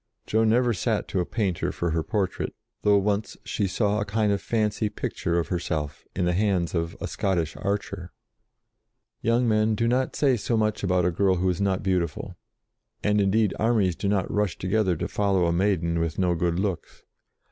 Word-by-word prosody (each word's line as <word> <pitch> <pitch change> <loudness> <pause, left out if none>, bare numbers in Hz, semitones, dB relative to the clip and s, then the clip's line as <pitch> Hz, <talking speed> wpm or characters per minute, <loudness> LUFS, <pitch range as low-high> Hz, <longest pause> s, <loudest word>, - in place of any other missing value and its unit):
Joan 110 0 +2
never 120 +1 +3
sat 100 - -1
to 95 - -1
a 90 - -1
painter 100 -7 -1
for 85 -1 -2
her 80 0 +1
portrait, 95 +2 -2 0.3
though 105 -1 +4
once 100 +1 -1
she 100 - -1
saw 105 +2 0
a - - +2
kind 105 0 0
of 100 -1 0
fancy 105 -1 0
picture 85 -4 -2
of 85 - -1
herself 75 -5 -3
in 90 - 0
the 90 - +2
hands 95 -3 +1
of 85 -1 -2
a - - -3
Scottish 85 -5 -1
archer. 100 -3 -3 1.1
Young 120 +2 +2
men 110 0 +2
do 115 +2 0
not 125 +2 +1
say 135 -4 +3
so 115 +2 -1
much 110 -1 0
about 90 -2 +2
a 90 - +2
girl 95 +2 +2
who 90 +1 +1
is 90 - -3
not 95 -2 0
beautiful, 90 -5 -1 0.7
and, 105 0 +3
indeed, 100 +1 +2
armies 110 -6 +2
do 100 - -3
not 100 -2 0
rush 105 -4 0
together 95 -1 +1
to - - -3
follow 100 -3 +1
a 85 - +1
maiden 85 -3 +1
with 80 -1 -2
no 90 -2 +2
good 85 0 0
looks. 95 -2 -3
100 Hz, 190 wpm, -25 LUFS, 90-105 Hz, 1.1 s, though